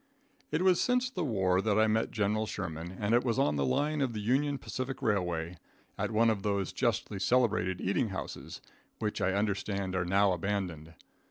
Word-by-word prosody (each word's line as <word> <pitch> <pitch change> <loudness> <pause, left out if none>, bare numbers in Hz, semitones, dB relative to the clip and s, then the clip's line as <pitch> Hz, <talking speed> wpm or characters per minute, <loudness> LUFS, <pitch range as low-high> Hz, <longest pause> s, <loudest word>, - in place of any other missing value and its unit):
It 155 +4 0
was 185 -2 +4
since 250 0 +1
the 180 - -2
war 95 -8 +2
that 105 0 +1
I 110 - +5
met 110 +1 +1
General 110 0 0
Sherman, 85 -2 -5
and 105 +2 0
it 120 - +4
was 115 -3 0
on 75 - +2
the 70 - 0
line 150 - +1
of 130 -4 0
the 110 - -4
Union 135 +6 +1
Pacific 130 0 -5
Railway, 90 -7 -1 0.4
at - - -2
one 115 +1 +3
of 105 -3 -2
those 100 -1 -1
justly 110 -4 -1
celebrated 110 -5 +2
eating 105 +5 0
houses, 95 - -6 0.4
which 105 -1 -2
I 95 - +2
understand 100 -1 -1
are 95 - +1
now 95 +3 +3
abandoned. 90 -4 -3
105 Hz, 185 wpm, -31 LUFS, 95-120 Hz, 0.4 s, I